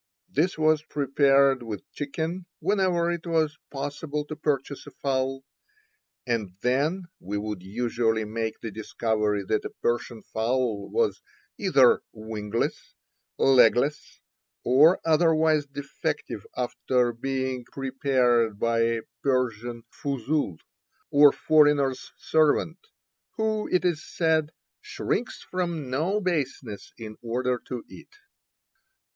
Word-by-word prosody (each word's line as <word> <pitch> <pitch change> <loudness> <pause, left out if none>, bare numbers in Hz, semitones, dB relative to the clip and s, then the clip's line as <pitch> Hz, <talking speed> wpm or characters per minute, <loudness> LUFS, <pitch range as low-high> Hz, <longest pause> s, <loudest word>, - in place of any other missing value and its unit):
This 165 +6 +1
was 155 -1 +3
prepared 140 -2 +3
with 110 -4 -6
chicken 160 +5 -4
whenever 180 -2 +1
it 170 0 -4
was 160 -2 +1
possible 145 +1 -4
to 155 - -6
purchase 145 -2 -2
a - - -6
fowl, 135 -1 -1 0.8
and 110 -7 -2
then 145 +9 +1 0.2
we 100 +3 -4
would 105 -2 -4
usually 110 +2 0
make 110 +1 -3
the 110 - -5
discovery 105 -1 -1
that 105 +3 0
a - - -4
Persian 120 -1 -2
fowl 115 -2 -1
was 460 -2 0 0.4
either 140 -11 +5
wingless, 110 0 -4 0.4
legless, 130 +2 +3 0.4
or 150 +9 +6
otherwise 160 -2 +3
defective 140 0 -4
after 125 0 0
being 130 +1 -2
prepared 130 -5 +1
by 115 +1 +1
a 115 0 +1 0.2
Persian 120 -3 -1
fuzul, 140 - -2 0.5
or 145 0 +8
foreigner's 145 -4 +3
servant, 160 +2 +2 0.5
who, 220 -1 -1
it 180 0 +2
is 170 -4 0
said, 160 -2 +1 0.3
"shrinks 420 - -3
from 170 -7 -3
no 170 +10 +1
baseness 140 - -3
in 110 -2 -8
order 125 +1 -1
to 125 -3 -5
eat." - - -14
135 Hz, 110 wpm, -26 LUFS, 115-155 Hz, 0.8 s, or